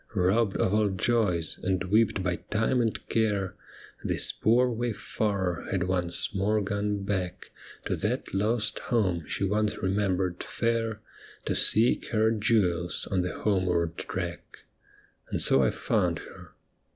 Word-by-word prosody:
Robbed 100 Hz, +2 st, +2 dB
of 95 Hz, -, +1 dB
all 105 Hz, -1 st, +3 dB
joys, 95 Hz, -4 st, 0 dB
and 95 Hz, 0 st, 0 dB
whipped 100 Hz, 0 st, +2 dB
by 90 Hz, -1 st, 0 dB
time 115 Hz, +4 st, 0 dB
and 115 Hz, -2 st, -2 dB
care. 105 Hz, -4 st, 0 dB, 0.5 s
This -, -, +3 dB
poor 120 Hz, +3 st, +3 dB
wayfarer 105 Hz, -5 st, -2 dB
had 95 Hz, -2 st, 0 dB
once 90 Hz, 0 st, 0 dB
more 105 Hz, +2 st, +1 dB
gone 100 Hz, 0 st, -2 dB
back 95 Hz, -3 st, -3 dB, 0.3 s
To -, -, 0 dB
that -, -, -3 dB
lost 105 Hz, +3 st, 0 dB
home 95 Hz, -9 st, +1 dB
she -, -, -2 dB
once 105 Hz, +2 st, 0 dB
remembered 95 Hz, -2 st, 0 dB
fair, 115 Hz, -2 st, -1 dB, 0.4 s
To -, -, 0 dB
seek 115 Hz, +3 st, +3 dB
her 110 Hz, 0 st, +2 dB
jewels 100 Hz, -6 st, +1 dB
on 95 Hz, -2 st, +2 dB
the 90 Hz, -, -2 dB
homeward 90 Hz, -5 st, +1 dB
track. 90 Hz, -2 st, -6 dB, 0.7 s
And -, -, -2 dB
so 65 Hz, -, +4 dB
I 65 Hz, -, +3 dB
found -, -, 0 dB
her. -, -, -12 dB
100 Hz, 140 wpm, -28 LUFS, 90-110 Hz, 0.7 s, so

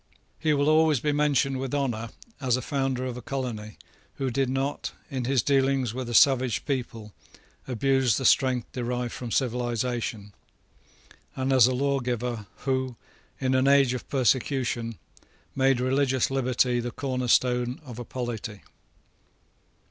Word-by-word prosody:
He 155 Hz, -1 st, +2 dB
will 145 Hz, +1 st, +1 dB
always 155 Hz, -2 st, +4 dB
be 150 Hz, +4 st, 0 dB
mentioned 140 Hz, -2 st, +1 dB
with 135 Hz, +1 st, -3 dB
honour 120 Hz, -5 st, -1 dB, 0.3 s
as 130 Hz, -3 st, +1 dB
a -, -, -3 dB
founder 135 Hz, -3 st, -1 dB
of 125 Hz, -1 st, -4 dB
a -, -, -7 dB
colony, 120 Hz, -6 st, -5 dB, 0.4 s
who 135 Hz, -2 st, -2 dB
did 135 Hz, +1 st, 0 dB
not, 135 Hz, +2 st, -2 dB, 0.2 s
in 130 Hz, -3 st, -2 dB
his 130 Hz, -2 st, +2 dB
dealings 135 Hz, -4 st, +2 dB
with 125 Hz, -1 st, -4 dB
a 120 Hz, -, -2 dB
savage 130 Hz, -3 st, +4 dB
people, 115 Hz, -6 st, -4 dB, 0.5 s
abuse 130 Hz, -1 st, +2 dB
the 135 Hz, -, -3 dB
strength 130 Hz, -3 st, +3 dB
derived 125 Hz, -1 st, -3 dB
from 120 Hz, -, -6 dB
civilisation, 120 Hz, -4 st, -2 dB, 1.0 s
and 130 Hz, +1 st, 0 dB
as 125 Hz, -3 st, +7 dB
a 130 Hz, -, 0 dB
lawgiver 125 Hz, -5 st, -1 dB, 0.2 s
who, 130 Hz, -2 st, 0 dB, 0.4 s
in 130 Hz, -1 st, 0 dB
an 130 Hz, +1 st, +3 dB
age 140 Hz, -2 st, +5 dB
of 125 Hz, -, -6 dB
persecution, 125 Hz, -3 st, 0 dB, 0.6 s
made 135 Hz, -1 st, +3 dB
religious 130 Hz, 0 st, +1 dB
liberty 125 Hz, -2 st, +1 dB
the 120 Hz, +1 st, -3 dB
cornerstone 125 Hz, -1 st, 0 dB
of 125 Hz, -3 st, -8 dB
a -, -, -4 dB
polity. 115 Hz, -4 st, -5 dB
130 Hz, 140 wpm, -26 LUFS, 120-135 Hz, 1.0 s, as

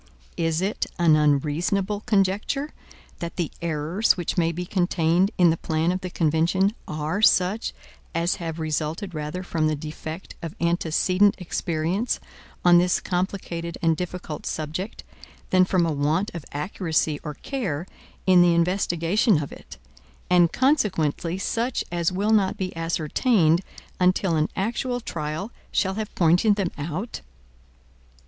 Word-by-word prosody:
Is 165 Hz, 0 st, 0 dB
it 195 Hz, +3 st, -1 dB
an 165 Hz, -3 st, +5 dB
unreasonable 155 Hz, +7 st, +1 dB
conjecture, 210 Hz, +9 st, +1 dB, 0.5 s
that 170 Hz, -1 st, -5 dB
the 170 Hz, -4 st, -2 dB
errors 170 Hz, +6 st, +1 dB
which 175 Hz, -2 st, -2 dB
may 165 Hz, -2 st, +2 dB
be 180 Hz, +2 st, -4 dB
contained 175 Hz, 0 st, +2 dB
in 175 Hz, -2 st, +6 dB
the 165 Hz, -, -1 dB
plan 160 Hz, +2 st, 0 dB
of 185 Hz, +1 st, -2 dB
the 185 Hz, -, -4 dB
convention 170 Hz, +5 st, +2 dB
are 155 Hz, +6 st, -2 dB
such 195 Hz, +1 st, +3 dB, 0.4 s
as 170 Hz, +1 st, +1 dB
have 165 Hz, -2 st, -5 dB
resulted 160 Hz, +5 st, -2 dB
rather 155 Hz, +4 st, -4 dB
from 160 Hz, -3 st, 0 dB
the 155 Hz, -, +1 dB
defect 155 Hz, +3 st, -7 dB
of 165 Hz, -2 st, -6 dB
antecedent 175 Hz, +4 st, +2 dB
experience 175 Hz, +4 st, -1 dB, 0.5 s
on 175 Hz, -1 st, +8 dB
this 180 Hz, 0 st, +2 dB
complicated 175 Hz, -2 st, -3 dB
and 165 Hz, -1 st, +4 dB
difficult 180 Hz, -2 st, -5 dB
subject, 160 Hz, +7 st, -4 dB, 0.5 s
than 185 Hz, 0 st, +5 dB
from 180 Hz, -2 st, +2 dB
a 165 Hz, -, 0 dB
want 155 Hz, +7 st, 0 dB
of 170 Hz, -4 st, -7 dB
accuracy 155 Hz, -1 st, -1 dB
or 150 Hz, -3 st, -5 dB
care 185 Hz, -, -3 dB, 0.4 s
in 185 Hz, -2 st, +6 dB
the 175 Hz, -1 st, +5 dB
investigation 175 Hz, +3 st, +2 dB
of 140 Hz, -, -8 dB
it; -, -, -12 dB, 0.5 s
and, 175 Hz, -2 st, +5 dB
consequently 185 Hz, -, +1 dB
such 230 Hz, +5 st, -1 dB
as 170 Hz, 0 st, 0 dB
will 205 Hz, +4 st, +1 dB
not 200 Hz, -3 st, +2 dB
be 185 Hz, -2 st, -4 dB
ascertained 165 Hz, -, +2 dB, 0.4 s
until 180 Hz, -1 st, +2 dB
an 155 Hz, 0 st, +1 dB
actual 245 Hz, +5 st, -1 dB
trial 160 Hz, 0 st, -4 dB, 0.2 s
shall 190 Hz, -1 st, +1 dB
have 215 Hz, +1 st, -5 dB
pointed 180 Hz, +5 st, +4 dB
them 195 Hz, -4 st, -1 dB
out? 170 Hz, +9 st, -4 dB
175 Hz, 140 wpm, -24 LUFS, 160-190 Hz, 0.5 s, on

